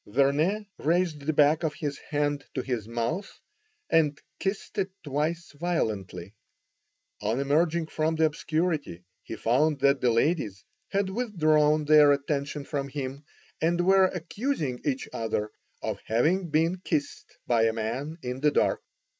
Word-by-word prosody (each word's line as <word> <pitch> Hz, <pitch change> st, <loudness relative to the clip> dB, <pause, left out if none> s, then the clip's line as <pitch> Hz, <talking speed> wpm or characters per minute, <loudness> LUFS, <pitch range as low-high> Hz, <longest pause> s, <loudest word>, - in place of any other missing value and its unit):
Vernet 145 Hz, -, +2 dB
raised 170 Hz, -1 st, +1 dB
the 145 Hz, +3 st, 0 dB
back 150 Hz, +1 st, +4 dB
of 160 Hz, -3 st, -1 dB
his 145 Hz, -4 st, -4 dB
hand 145 Hz, -1 st, 0 dB
to 130 Hz, -, -1 dB
his 120 Hz, -5 st, -3 dB
mouth 120 Hz, -, -3 dB, 0.5 s
and 150 Hz, -3 st, +2 dB, 0.2 s
kissed 195 Hz, +2 st, -3 dB
it 195 Hz, 0 st, 0 dB
twice 155 Hz, +4 st, -2 dB
violently. 110 Hz, -, -3 dB, 0.9 s
On 110 Hz, +4 st, 0 dB
emerging 160 Hz, +4 st, +2 dB
from 160 Hz, +1 st, -1 dB
the 160 Hz, 0 st, +3 dB
obscurity 155 Hz, -, -1 dB, 0.2 s
he 110 Hz, -, -7 dB
found 135 Hz, +8 st, +2 dB
that 140 Hz, -1 st, +3 dB
the 125 Hz, -, +3 dB
ladies 115 Hz, -, 0 dB, 0.3 s
had 195 Hz, -1 st, 0 dB
withdrawn 155 Hz, -9 st, +2 dB
their 150 Hz, -1 st, +7 dB
attention 140 Hz, 0 st, -2 dB
from 140 Hz, -1 st, -3 dB
him, 140 Hz, +1 st, -5 dB, 0.4 s
and 170 Hz, +2 st, +2 dB
were 190 Hz, 0 st, +6 dB
accusing 180 Hz, -, -2 dB
each 135 Hz, -2 st, -1 dB
other 110 Hz, -1 st, -2 dB, 0.3 s
of -, -, -2 dB
having 165 Hz, -, +1 dB
been 165 Hz, +4 st, +2 dB
kissed 155 Hz, -5 st, -3 dB
by 115 Hz, -2 st, +3 dB
a 115 Hz, -, +3 dB
man 120 Hz, +8 st, -3 dB
in 125 Hz, +1 st, -4 dB
the 150 Hz, +2 st, +4 dB
dark. -, -, +1 dB
150 Hz, 145 wpm, -27 LUFS, 130-165 Hz, 0.9 s, their